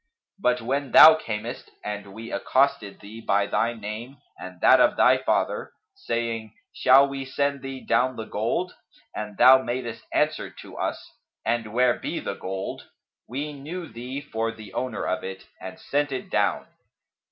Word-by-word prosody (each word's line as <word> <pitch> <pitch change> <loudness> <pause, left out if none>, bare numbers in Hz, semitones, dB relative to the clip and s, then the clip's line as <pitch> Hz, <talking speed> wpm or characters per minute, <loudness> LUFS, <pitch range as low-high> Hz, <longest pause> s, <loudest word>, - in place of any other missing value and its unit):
But, 125 -6 +1
when 135 +4 -2
thou 160 +1 +11
camest 110 -9 -5 0.2
and 105 -1 -5
we 115 +1 -8
accosted 130 -7 0
thee 110 +3 -10
by 100 -2 +2
thy 115 +3 0
name 110 +5 -7 0.2
and 90 -1 -10
that - - +6
of - - +4
thy 130 +1 +5
father, - - -1 0.2
saying, 115 - -3 0.2
'Shall 135 +2 +6
we 135 0 -5
send 140 +1 -1
thee 135 -1 -7
down 130 +1 +2
the 110 - -5
gold?' 120 - -2 0.4
and 105 -1 -6
thou 130 +1 +8
madest 120 -2 -4
answer - - 0
to - - -12
us, - - -3 0.4
'And 115 -2 -1
where 125 +1 +2
be - - -3
the - - -4
gold?' 95 +1 -6 0.4
we 145 +5 -4
knew 160 +5 -7
thee 125 +4 -6
for 115 -5 -3
the 110 -3 -12
owner 125 -3 -3
of 110 - -2
it 95 0 -7 0.2
and 95 0 -8
sent 145 0 -1
it 130 - -5
down. - - +1
120 Hz, 165 wpm, -25 LUFS, 110-135 Hz, 0.4 s, thou